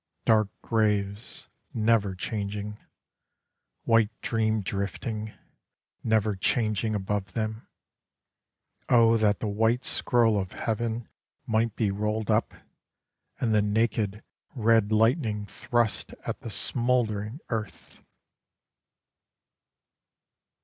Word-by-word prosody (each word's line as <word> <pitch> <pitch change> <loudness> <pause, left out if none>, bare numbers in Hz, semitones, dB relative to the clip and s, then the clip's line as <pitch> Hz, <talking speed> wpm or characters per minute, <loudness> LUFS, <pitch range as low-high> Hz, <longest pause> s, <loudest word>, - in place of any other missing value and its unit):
Dark 110 -2 +4
graves 105 -1 0 0.3
never 110 -3 +2
changing, 105 +1 -4 1.0
White 115 -2 +4
dream 110 -1 +1
drifting, 105 +3 -3 0.7
never 110 -2 +2
changing 110 +2 0
above 100 -1 -2
them: 110 0 -3 1.2
O 115 -1 +6
that 105 -2 +2
the 110 - -1
white 110 +4 +1
scroll 115 -6 +2
of 95 -2 -4
heaven 115 +1 -2 0.4
might 110 0 +1
be 105 -4 +1
rolled 105 +1 -1
up, - - +1 0.8
And 115 -3 +1
the 105 - +4
naked 105 0 0 0.3
red 115 -3 +3
lightning 110 -1 +2
thrust 115 +2 -1
at - - -3
the - - -7
smouldering 115 +1 0
earth! 110 -4 -5
110 Hz, 95 wpm, -27 LUFS, 105-115 Hz, 1.2 s, O